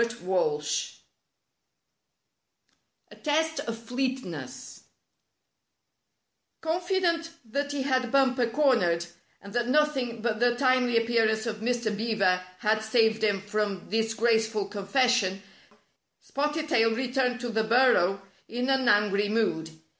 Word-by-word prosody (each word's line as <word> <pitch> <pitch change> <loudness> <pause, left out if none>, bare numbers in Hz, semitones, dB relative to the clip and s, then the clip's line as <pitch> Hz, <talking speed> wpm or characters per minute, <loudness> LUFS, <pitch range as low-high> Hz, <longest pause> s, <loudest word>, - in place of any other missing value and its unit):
STORY 190 -10 0
V 150 - -2 2.2
A - - -12
TEST 320 +1 0
OF 230 -1 -4
FLEETNESS 230 - -5 1.8
Confident 340 0 0 0.2
that 280 +6 -3
he 285 -2 -2
had 255 -3 0
Bumper 260 -3 +3
cornered, 225 - +2 0.4
and 200 0 -11
that 240 0 0
nothing 260 -5 0
but 220 -3 -1
the 240 0 +3
timely 255 -2 +2
appearance 225 -1 +1
of 225 -2 -3
Mr. 230 -1 -1
Beaver 205 -4 +1 0.2
had 215 +1 +1
saved 220 0 +2
him 205 -3 +1
from 205 -2 -3
disgraceful 225 -1 +1
confes 215 +6 +1
sion, 195 -3 -2 0.8
Spotted 300 +2 -3
Tail 225 -5 +3
returned 250 0 -1
to 245 - -3
the 220 -1 0
burrow 220 -5 +3 0.2
in 245 +3 -3
an 265 -2 +1
angry 205 -1 +2
mood. 210 -8 0
230 Hz, 115 wpm, -27 LUFS, 210-260 Hz, 2.2 s, Bumper